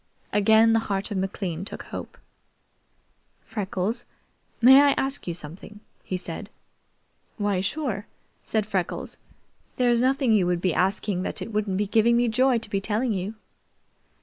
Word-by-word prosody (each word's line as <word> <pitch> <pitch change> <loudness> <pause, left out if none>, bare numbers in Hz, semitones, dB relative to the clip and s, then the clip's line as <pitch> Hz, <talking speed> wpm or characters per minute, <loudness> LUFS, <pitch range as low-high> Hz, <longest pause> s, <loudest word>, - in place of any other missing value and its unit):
Again 220 +2 +5
the 225 - +4
heart 195 +2 -2
of 200 - -2
McLean 190 -3 -3
took 200 - -7
hope. - - -8 1.3
"Freckles, 205 +2 -3 0.5
may 265 +3 +8
I 285 -1 +5
ask 270 -4 -2
you 170 - -2
something?" 175 +6 -10 0.2
he 185 - -3
said. 180 +3 -7 0.9
"Why, 205 -3 0
sure," 215 -2 -3 0.4
said 215 -2 -1
Freckles. 190 -4 -3 0.6
"There's 240 -2 +3
nothing 265 -1 +2
you 195 -5 +3
would 175 -1 +1
be 180 -1 +1
asking 190 +1 0
that - - -4
it 225 - -6
wouldn't 205 -3 0
be 210 - +1
giving 225 +3 +3
me 240 0 +2
joy 255 +2 +3
to 230 -2 -4
be 195 - 0
telling 220 +3 0
you." 195 +3 -3
210 Hz, 150 wpm, -25 LUFS, 190-235 Hz, 1.3 s, may